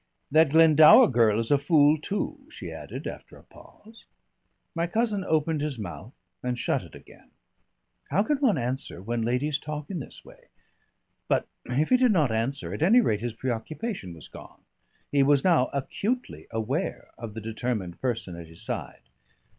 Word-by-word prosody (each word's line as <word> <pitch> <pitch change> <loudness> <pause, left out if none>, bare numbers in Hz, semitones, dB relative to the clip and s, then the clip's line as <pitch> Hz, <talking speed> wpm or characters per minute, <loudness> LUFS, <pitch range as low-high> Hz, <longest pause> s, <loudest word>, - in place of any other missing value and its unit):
"That 155 0 +5
Glendower 155 0 +7
girl 115 -4 +3
is 115 +2 -1
a 145 - +5
fool 145 0 +4
too," 205 - -4
she - - -8
added - - -8
after - - -8
a - - -18
pause. 225 +2 -18 0.7
My 170 0 -1
cousin 215 +1 0
opened 160 -2 0
his 150 -3 -2
mouth 105 +4 -8 0.3
and 125 -1 -2
shut - - 0
it - - -14
again. - - -17 0.8
How 190 +8 +2
can 295 +5 0
one 265 -7 +2
answer 130 -4 -4
when 115 +5 -3
ladies 130 +6 0
talk 150 +2 -6
in 180 - -3
this 135 - -10
way? - - -17 0.8
But - - +1 0.2
if 140 +5 0
he 255 - +5
did 250 -2 +4
not 155 - +2
answer, 120 +6 -2
at - - -6
any 205 +10 +6
rate 110 - +1
his 120 -1 -3
preoccupation 125 - -4
was 80 - -11
gone. - - -13 0.5
He 145 - +3
was 140 0 +4
now 165 -8 +4
acutely 220 - -3
aware 115 +7 -3
of 115 -2 -8
the 110 - -5
determined 110 -5 -4
person 115 -8 -2
at 85 -1 -9
his 80 0 -12
side. - - -5
140 Hz, 170 wpm, -26 LUFS, 115-165 Hz, 0.8 s, Glendower